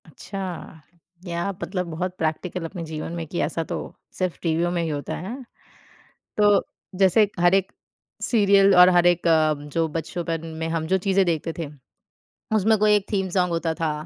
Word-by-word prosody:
अच्छा। 180 -1 -7 0.4
क्या 170 -2 -3
आप 200 0 -4
मतलब 180 -2 -3
बहुत 180 +3 -3
प्रैक्टिकल 165 +3 -2
अपने 170 +1 -6
जीवन 155 0 -5
में 165 -1 -4
कि 170 - -4
ऐसा 165 +1 -3
तो - - -5 0.4
सिर्फ़ 185 -2 -1
टीवियों 170 +1 0
में 175 -1 -1
ही 165 - -2
होता 145 -2 -4
हैं। 195 +8 -6 1.0
तो 205 -1 +5 0.4
जैसे 200 +3 +5
हर 175 +1 +5
एक 195 -1 0 0.5
सीरियल 200 -3 +4
और 180 0 +8
हर 175 -1 +4
एक 175 -1 +2
अ, 155 -2 +4
जो 150 +3 -2
बचपन 165 +1 -4
में 160 0 -2
हम 165 -1 -2
जो 190 - +2
चीजें 195 0 +2
देखते 165 -1 -1
थे, 165 - -3 0.9
उसमें 215 +1 +3
कोई 210 0 +5
एक 205 -1 0
थीम 190 -2 0
सॉन्ग 180 -1 +1
होता 165 -1 -1
था, 160 -1 -1
175 Hz, 180 wpm, -24 LUFS, 165-190 Hz, 1.0 s, और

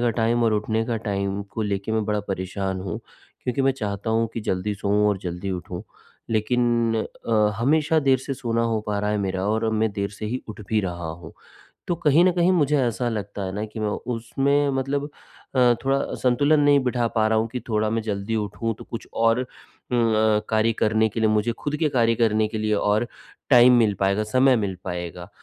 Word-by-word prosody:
का 120 -1 +2
टाइम 115 +1 +1
और 110 - +3
उठने 110 +1 0
का 115 - -1
टाइम 100 -2 -2
को 110 - -3
लेके 100 +1 -2
मैं 110 -1 +1
बड़ा 105 0 0
परेशान 95 0 -3
हूँ, 90 -3 -4 0.4
क्योंकि 130 +2 -1
मैं 135 0 +3
चाहता 105 -3 -4
हूँ 115 +1 +2
कि 115 - -2
जल्दी 105 0 -2
सोऊँ 100 +1 +1
और 100 -2 0
जल्दी 90 +2 -4
उठूँ, 90 0 -5 0.5
लेकिन 120 +1 +1 0.3
अ, 105 -2 +3
हमेशा 150 +5 +2
देर 135 -3 +3
से 135 +2 -5
सोना 115 -3 -1
हो 115 -1 0
पा 105 -1 -1
रहा 105 +1 -1
है 105 - 0
मेरा 95 -1 -2
और 110 +1 +1
मैं 110 0 +1
देर 100 -1 -2
से 105 +1 -6
ही 125 +4 -3
उठ 105 0 -8
भी 110 -1 +2
रहा 85 -4 -4
हूँ। 80 0 -10 0.6
तो 175 - +2
कहीं 160 +1 +4
न 185 - +5
कहीं 175 0 +3
मुझे 150 -4 +2
ऐसा 120 0 0
लगता 100 -2 -4
है 95 - -4
ना 105 +1 -2
कि 110 +1 -8
मैं 105 - 0 0.3
उसमें 140 +5 +1
मतलब 135 +2 -1 0.5
अ, 125 -1 +5
थोड़ा 135 +1 +2 0.2
संतुलन 145 +4 +3
नहीं 145 -1 +5
बिठा 120 -2 +1
पा 110 -2 +3
रहा 110 0 +2
हूँ 115 - 0
कि 125 - -3
थोड़ा 110 -1 +1
मैं 115 0 -1
जल्दी 105 +1 -2
उठूँ 110 +2 -2
तो - - -10
कुछ 115 - -7
और 115 +2 +2
उम, 130 - -3 0.9
अ, - - -2
कार्य 110 +1 +2
करने 110 0 +2
के 110 +2 -4
लिए 110 - +3
मुझे 110 +2 +1
ख़ुद 145 0 -2
के 155 0 +1
कार्य 115 -4 +2
करने 110 -2 +2
के 110 0 -4
लिए 110 0 0
और 105 +3 +1 0.4
टाइम 125 -1 +8
मिल 110 -3 +3
पाएगा, 100 +2 +2
समय 130 +4 +4
मिल 100 -4 -2
पाएगा। 90 0 -5
110 Hz, 215 wpm, -24 LUFS, 105-125 Hz, 0.9 s, टाइम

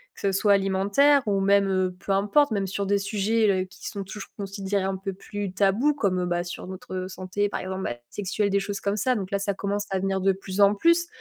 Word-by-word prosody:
que - - -13
ce 195 - +1
soit 200 +1 +3
alimentaire 200 +9 +3
ou 200 -1 +2
même, 200 0 +4
heu, 185 -1 0
peu 195 - -4
importe, 210 +8 +3
même 200 -2 0
sur 200 +1 -2
des 200 +1 +2
sujets, 210 +2 +1
heu, - - -8
qui 185 - -11
sont 200 -1 -5
toujours 195 +1 -8
considérés 195 0 -2
un 195 0 -1
peu 195 +1 -4
plus 200 0 -5
tabous 205 +10 +3
comme, 190 -9 0
bah, 175 0 -1
sur 175 - -7
notre, 185 0 -8
heu, 185 0 -3
santé, 185 +2 -2
par - - -3
exemple, 190 0 -4
bah, 120 - -2
sexuelle, 205 +1 -1
des 200 0 +2
choses 200 0 -4
comme 200 +1 -1
ça. 250 +5 +1
Donc 195 -2 -4
là, 200 - 0
ça 200 0 -1
commence 200 +1 -2
à 190 - 0
venir 195 0 0
de 195 +1 +4
plus 190 +1 -3
en 200 +1 +6
plus. 335 +8 +3
200 Hz, 245 wpm, -25 LUFS, 190-205 Hz, -, en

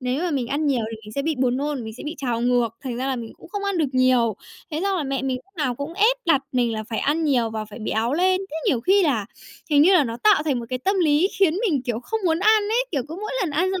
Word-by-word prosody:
Nếu 255 +4 -1
mà 360 - 0
mình 270 -5 -1
ăn 285 +4 -1
nhiều 255 -6 +1
thì 225 - -6
mình 215 - -10
sẽ 280 - -1
bị 315 +2 0
buồn 255 -1 +1
nôn, 285 -3 -2
mình 220 0 -7
sẽ - - -9
bị 310 - -4
trào 245 -4 -2
ngược, 245 -1 +2 0.2
thành 250 -3 -3
ra 260 +2 -2
là 265 - -1
mình 230 -2 -7
cũng - - -14
không 405 +2 -4
ăn 400 -3 -1
được 310 -4 +1
nhiều. 255 -3 +3 0.4
Thế 310 0 -2
xong 395 -1 +1
là - - -1
mẹ 270 -2 -2
mình 265 -1 -1
lúc 380 +9 -16
nào 260 -5 0
cũng 285 +6 -6
ép 435 +6 +4
đặt 285 -5 +4
mình 245 -2 +1
là 220 -1 -4
phải 220 - -2
ăn 315 +3 0
nhiều 245 -6 +2
và 220 -1 -4
phải 215 +1 -11
béo 225 +2 -1
lên. 370 +3 +2
Thế 315 - -5
nhiều 250 - +2
khi 385 +10 +4
là 245 - +1 0.4
hình 290 -1 +6
như 365 +5 +6
là 310 - +5
nó 230 -2 -4
tạo 415 -7 +5
thành 290 -5 0
một 235 - -8
cái 255 0 -2
tâm 390 +10 0
lý 315 +2 +3
khiến 370 -5 +4
mình, 290 -7 0
kiểu, 240 -2 -3
không 445 - -3
muốn 325 -2 +2
ăn 430 +2 +4
ấy, 455 +4 +1
kiểu, 280 -5 0
cứ 320 - -6
mỗi 425 +4 -5
lần 355 - -1
ăn 345 +6 +1
xong 380 - -2
280 Hz, 310 wpm, -23 LUFS, 245-350 Hz, 0.4 s, hình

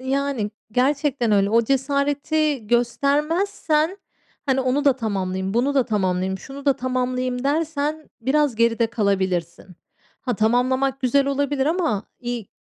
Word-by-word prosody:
Yani, 265 -4 -1 0.2
gerçekten 270 -2 +1
öyle. 200 -1 +3
O 230 +1 +4
cesareti 280 +1 0
göstermezsen, 300 - +1 0.5
hani, 265 -1 +2
onu 260 +3 0
da 280 - +6
tamamlayayım, 190 -4 -2
bunu 265 +5 +1
da 265 -3 +3
tamamlayayım, 190 -2 -1
şunu 275 +5 -10
da 280 - +5
tamamlayayım 255 0 -2
dersen 305 +1 -1
biraz 280 +2 +2
geride 230 0 +2
kalabilirsin. 190 -7 -1 0.5
Ha, 245 -3 -2
tamamlamak 260 +4 +1
güzel 270 +2 +2
olabilir 280 0 0
ama 315 - 0 0.2
i 240 -4 -3
260 Hz, 125 wpm, -22 LUFS, 225-285 Hz, 0.5 s, da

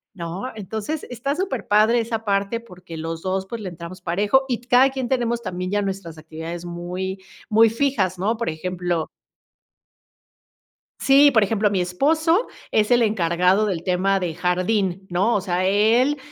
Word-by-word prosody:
¿no? 175 +7 -5
Entonces 220 - -4
está 275 +4 -2
superpadre 235 - +2
esa 225 -1 -3
parte, 200 +2 0
porque 180 -7 -11
los 165 +1 -5
2, 190 +1 -2
pues, 225 +3 -6
le 190 - -4
entramos 170 +2 -9
parejo 205 +10 +2
y 245 -3 -1
t 245 - -22
cada 255 +2 +5
quien 265 -2 -4
tenemos 235 -2 0
también 180 -1 -4
ya 205 +1 0
nuestras 190 -4 -5
actividades 160 +2 -7
muy, 180 +2 -5 0.3
muy 225 +1 +5
fijas, 225 -7 0
¿no? 205 +6 0
Por 230 -3 -2
ejemplo 175 0 -3 1.9
sí, 280 +1 +6
por 220 -4 +4
ejemplo, 210 +1 +1
mi 195 -2 0
esposo 315 - +1 0.2
es 210 -1 +2
el 240 0 +5
encargado 185 -1 +2
del 180 -5 -2
tema 190 +2 +1
de 175 -3 -3
jardín, 185 +2 0
¿no? 195 +7 +1
O 205 - +1
sea, 185 0 -1
él 225 +9 +3
195 Hz, 160 wpm, -22 LUFS, 180-235 Hz, 1.9 s, sí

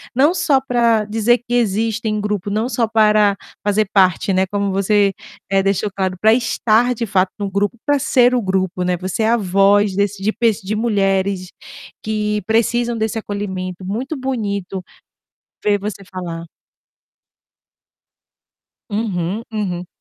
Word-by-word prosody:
não 285 +6 +4
só 280 -6 +2
pra 235 -4 +2
dizer 225 +3 +2
que 245 0 -3
existem 220 -1 0
grupo, 205 -1 -2
não 220 +4 -1
só 235 -3 0
para 215 -2 +4 0.3
fazer 210 +1 +2
parte, 190 -1 +3
né, 190 +1 +2
como 200 0 -1
você, 200 +1 +2 0.4
eh, 195 0 +2
deixou 195 +1 0
claro, 190 -1 -1
pra 220 +1 +5
estar 235 0 +2
de 235 -1 -3
fato 190 -2 +1
no 200 -1 -2
grupo, 205 +4 0
pra 290 -1 +3
ser 250 -2 +3
o 245 - +1
grupo, 190 -1 -1
né, 180 0 0
você 185 +5 -2
é 220 - +2
a 235 - +3
voz 200 0 +3
desse 200 0 -1
de 215 +2 +1
pe 235 - -2 0.2
de 205 +3 -2
mulheres 195 -4 0 0.6
que 210 -1 -1
precisam 235 +2 +1
desse 220 0 -1
acolhimento, 190 -3 -5
muito 245 +10 -3
bonito 200 -8 -3 0.8
ver 205 -1 +3
você 200 0 -5
falar. 175 -3 -6 2.5
Uhum, 205 -1 -2
uhum. 180 -5 -3
205 Hz, 145 wpm, -19 LUFS, 195-225 Hz, 2.5 s, pra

